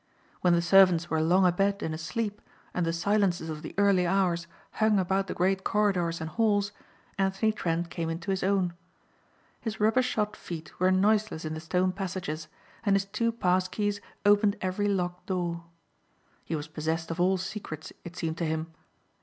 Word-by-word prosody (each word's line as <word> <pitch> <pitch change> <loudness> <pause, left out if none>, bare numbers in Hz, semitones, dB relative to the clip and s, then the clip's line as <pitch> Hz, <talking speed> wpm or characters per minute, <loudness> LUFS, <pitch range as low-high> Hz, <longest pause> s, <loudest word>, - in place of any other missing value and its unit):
When 180 -1 +3
the 170 0 +3
servants 175 -2 +5
were 160 -1 +2
long 180 +4 +4
abed 195 +3 +2
and 160 - -2
asleep 205 +7 -3 0.3
and 175 -2 0
the - - +2
silences 180 -1 +1
of 155 -1 -5
the 155 - -8
early 195 -3 +4
hours 175 -2 +1 0.2
hung 215 -1 +2
about 190 +1 +1
the - - -4
great 190 +2 +1
corridors 185 -5 +1
and 160 - -4
halls 205 -2 +2 0.5
Anthony 195 +3 +2
Trent 170 -4 -2
came 165 -2 -3
into 165 +3 -3
his 190 - -1
own. 190 -2 +1 0.9
His 220 -2 -5
rubbershod 220 -1 +2
feet 165 -2 -8
were 185 +1 +4
noiseless 205 -2 +2
in 155 - -3
the 155 - -4
stone 180 +3 +1
passages 180 -5 -4 0.4
and 200 -3 +3
his 195 0 +1
two 210 +4 0
pass 185 -4 +1
keys 205 +1 -2 0.2
opened 205 0 +4
every 190 +2 -1
locked 180 -3 -2
door. 175 -2 -2 0.8
He 165 - -2
was 150 0 -4
possessed 160 +2 -3
of 170 +2 -2
all 190 +1 +3
secrets 180 -5 -6
it 175 0 -9
seemed 165 -1 -3
to 170 - 0
him. 160 +1 -3
185 Hz, 175 wpm, -28 LUFS, 170-200 Hz, 0.9 s, servants